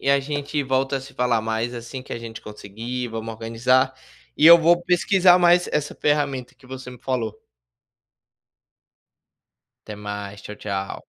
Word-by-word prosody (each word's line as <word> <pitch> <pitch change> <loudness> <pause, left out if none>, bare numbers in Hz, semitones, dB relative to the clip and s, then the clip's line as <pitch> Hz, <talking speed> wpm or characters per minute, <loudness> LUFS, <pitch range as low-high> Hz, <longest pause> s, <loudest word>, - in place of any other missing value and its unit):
e - - -3
a 140 0 +4
gente 145 +1 -3
volta 135 +1 0
a - - -9
se 135 +1 -12
falar 125 -2 +1
mais, 110 +2 -2
assim 120 +2 -7
que 130 - -10
a - - -4
gente 115 -1 -9
conseguir. 115 +4 -6
Vamos 115 0 -5
organizar, 125 +4 +1 0.4
e 155 - +5
eu 170 +1 +11
vou 170 +1 +3
pesquisar 180 +1 +4
mais 175 0 +4
essa 150 -1 -1
ferramenta 145 -4 -1
que 140 - -25
você 130 0 -9
me 125 - -13
falou. 115 -5 -2 2.5
Até 105 - -8
mais, 105 -1 -7
tchau 105 - -9
tchau. 100 -2 -5
125 Hz, 160 wpm, -23 LUFS, 115-145 Hz, 2.5 s, eu